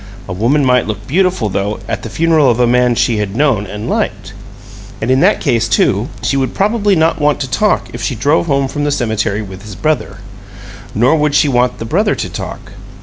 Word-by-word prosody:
A 90 - -4
woman 125 +9 +1
might 125 -3 +2
look 105 -1 -5
beautiful, 180 - +1
though, 100 +1 -2
at - - -3
the 115 - -7
funeral 160 0 +2
of 120 0 +1
a 125 - +4
man 125 +1 +3
whom 120 - +1
she 120 -1 +1
had 105 -1 -3
known 125 -7 +1
and 105 +3 -6
liked. - - -2 0.7
And 115 +3 -1
in 130 - +3
that - - +3
case, 115 -1 0
too, 105 +8 +1
she - - 0
would 130 -2 -1
probably 205 0 +1
not 160 -1 +1
want 145 0 +2
to 135 - -2
talk 205 +12 0
if 120 - -6
she 115 +3 -2
drove 145 +9 +1
home 140 -2 +1
from 145 +2 -4
the 145 - +1
cemetery 110 -6 -1
with 95 -1 -10
his 105 -1 -10
brother: 155 +7 -1 0.8
nor 125 +8 +3
would 150 -2 +1
she - - +4
want 125 -2 +1
the 115 - -6
brother 205 - +1
to - - -4
talk. - - -7
125 Hz, 220 wpm, -15 LUFS, 110-150 Hz, 0.8 s, a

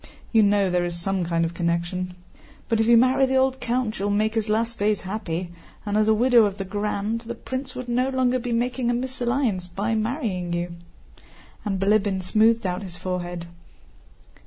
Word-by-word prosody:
(You 225 - +5
know 200 -2 +3
there 180 0 +2
is 175 -1 -3
some 195 +1 -1
kind 165 0 0
of 165 - -4
connection.) 175 +2 -2 0.5
But 225 -2 +1
if 225 - +2
you 235 0 +7
marry 255 +2 +4
the 265 - 0
old 265 0 +2
count 240 -3 -1
you 200 - -1
will 205 - +1
make 215 +2 +1
his 220 -1 -1
last 230 +2 0
days 210 0 +1
happy, 185 -3 -4 0.3
and 205 0 -1
as 215 0 +3
widow 235 +1 +5
of 200 -1 -2
the 195 - -4
Grand... 210 +2 -2
the 235 0 -6
prince 260 +2 -5
would 255 -1 -6
no 250 +2 +1
longer 255 -1 +1
be 245 0 -4
making 240 +1 0
a 240 - +2
mésalliance 245 -6 -1
by 205 +5 -1
marrying 215 - -2
you," 175 0 -2 0.9
and 195 -3 -2
Bilíbin 200 -1 +2
smoothed 220 +3 +3
out 180 +1 -1
his 180 -3 -8
forehead. 175 -1 -4
215 Hz, 190 wpm, -24 LUFS, 185-240 Hz, 0.9 s, you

